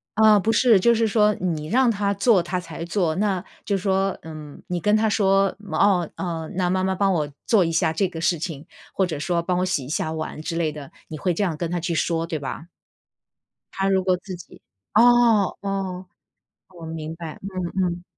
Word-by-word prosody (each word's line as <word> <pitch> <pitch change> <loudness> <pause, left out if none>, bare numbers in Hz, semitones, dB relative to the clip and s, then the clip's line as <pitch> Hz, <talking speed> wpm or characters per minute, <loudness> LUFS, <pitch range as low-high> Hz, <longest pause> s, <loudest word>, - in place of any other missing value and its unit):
呃， 215 -1 +6
不 210 - -1
是 230 -5 +5
就 235 +5 +4
是 225 0 +2
说 210 0 +3
你 165 -5 -3
让 250 +6 +3
她 200 -2 0
做 200 0 +3
她 175 +2 -3
才 170 -1 -7
做， 175 -2 0
那 195 -2 0 0.2
就 200 - 0
是 185 - -8
说， 195 -1 +1
嗯， 155 -2 -10
你 180 -1 -2
跟 210 +5 +2
她 220 0 +2
说， 195 -2 +2 0.2
哦， 185 -5 +2
哦， 165 -3 -4
那 180 -1 +1
妈 185 +1 +1
妈 190 0 0
帮 195 +1 +2
我 150 -4 -1 0.2
做 205 -6 +4
一 165 - -1
下 160 -1 +2
这 175 +5 0
个 165 -2 -7
事 170 0 +1
情， 155 -2 -5 0.3
或 190 - +2
者 160 -5 -4
说 170 +3 0
帮 180 +1 -1
我 185 - +1
洗 180 -8 -1
一 - - -9
下 160 0 -2
碗 155 -1 -5
之 165 - -4
类 165 -2 0
的， 145 -2 -10 0.2
你 155 - -6
会 180 +3 0
这 185 - -1
样 170 -6 -1
跟 170 +1 -3
她 175 +1 -1
去 170 - -2
说， 165 0 0
对 160 -2 -4
吧？ 145 +4 -6 1.1
她 195 0 0
如 190 -1 +2
果 185 -1 +2
自 185 0 -8
己 175 - -14 0.3
哦， 230 -3 +5
哦， 195 -2 -3 0.7
我 170 -2 -9
明 160 0 -6
白， 165 -2 -8
嗯， 185 -1 -3
嗯。 175 0 -3
180 Hz, 230 characters per minute, -23 LUFS, 165-200 Hz, 1.1 s, 呃